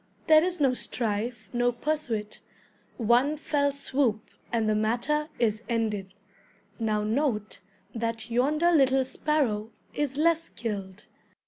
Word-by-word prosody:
There 310 -1 +7
is 360 -1 -1
no 270 -3 +3
strife, 225 -2 -3
no 245 0 +2
pursuit, 235 -5 -3 0.6
one 245 +6 +3
fell 285 -1 +1
swoop, 265 -5 -1 0.2
and 225 -2 +1
the 215 - +3
matter 240 +8 0
is 220 -2 +1
ended. 210 -5 -1 0.6
Now 215 -2 0
note 220 -2 -1 0.3
that 230 0 -3
yonder 300 +8 +3
little 270 -4 +4
sparrow 260 -5 0 0.2
is 285 -2 -2
less 330 +1 +3
skilled. 200 - -6
240 Hz, 120 wpm, -27 LUFS, 220-290 Hz, 0.6 s, There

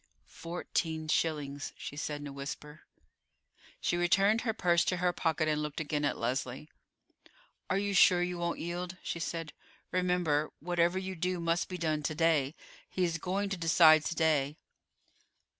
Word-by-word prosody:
"Fourteen 165 -2 -3
shillings," 145 -3 -1
she - - -7
said 150 0 -4
in - - -7
a 140 - -8
whisper. 150 +2 -8 0.9
She 175 - 0
returned 195 +5 +3
her 230 - 0
purse 175 -5 +2
to 185 - 0
her 180 0 +1
pocket, 160 -2 0
and 150 -1 +1
looked 150 0 -4
again 150 -1 -1
at - - 0
Leslie. 130 +4 -3 1.0
"Are 190 - +2
you 200 0 -1
sure 180 -2 +6
you 180 0 -3
won't 170 0 -1
yield?" 175 +2 -4
she 170 - -3
said. 165 -2 -4 0.4
"Remember, 180 -5 +1
whatever 175 +2 +1
you 190 0 -3
do 180 +1 -1
must 170 0 0
be 180 - -4
done 155 -3 0
to 155 +1 -2
day; 160 -3 +2 0.3
he 185 - -1
is 165 -1 0
going 195 +4 -1
to 195 - -1
decide 160 -2 +6
to 170 - -2
day." 150 -3 +1
165 Hz, 165 wpm, -31 LUFS, 150-180 Hz, 1.0 s, sure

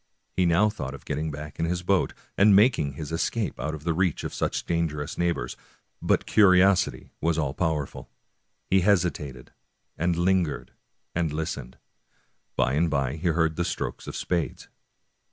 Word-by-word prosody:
He 90 -1 +3
now 90 +5 +4
thought 70 - -4
of 70 - -14
getting 75 +2 -2
back 75 0 -7
to - - -1
his 85 +2 -1
boat, 95 0 +1 0.2
and 100 0 +6
making 100 - +4
his 75 +2 -7
escape 100 +6 -1
out 75 0 -2
of 75 - -10
the 85 0 +1
reach 90 -1 0
of - - -4
such - - -2
dangerous 80 -4 -1
neighbors; 85 -8 -1 0.5
but - - +1
curiosity 95 -2 +4
was 80 0 +1
all 70 -4 0
powerful. 75 -3 -2 0.6
He 95 0 +4
hesitated, 85 -9 0 0.5
and 85 +2 +1
lingered, 85 -3 +1 0.4
and 85 -3 0
listened. 75 -5 -4 0.8
By 60 - +2
and 80 +4 +2
by 70 -1 0
he 85 +3 -2
heard 80 -1 +1
the 85 - +1
strokes 90 - -4
of - - -6
spades. 85 -3 -2
85 Hz, 160 wpm, -26 LUFS, 75-90 Hz, 0.8 s, and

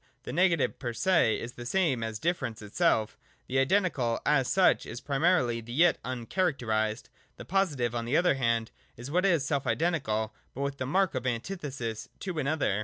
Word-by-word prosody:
The - - -6
negative 170 -2 +2
per 120 -3 -3
se 165 -6 +2
is 115 - -6
the 120 - -8
same 140 -3 +1
as 110 -1 -3
difference 140 -8 -2
itself. 110 - +1 0.3
The 130 +1 0
identical 135 - +1
as 135 -4 +3
such 190 -1 +3
is 120 - -6
primarily 135 -5 +1
the 120 +1 -9
yet 165 +5 +4
uncharacterised: 120 - -1 0.3
the - - -9
positive 150 -11 0
on 120 -1 -2
the 125 +6 +2
other 175 -3 +4
hand 115 -4 0 0.3
is 120 +4 -7
what 180 +4 +3
is 165 -7 +2
self 140 -1 -1
identical, 130 -10 0 0.2
but 135 - -4
with 140 0 -2
the 130 - -3
mark 190 +4 +2
of 130 -1 -2
antithesis 125 - -4
to 180 -5 -3
an 140 - -1
other. 145 -10 +1
135 Hz, 180 wpm, -29 LUFS, 115-170 Hz, 0.3 s, yet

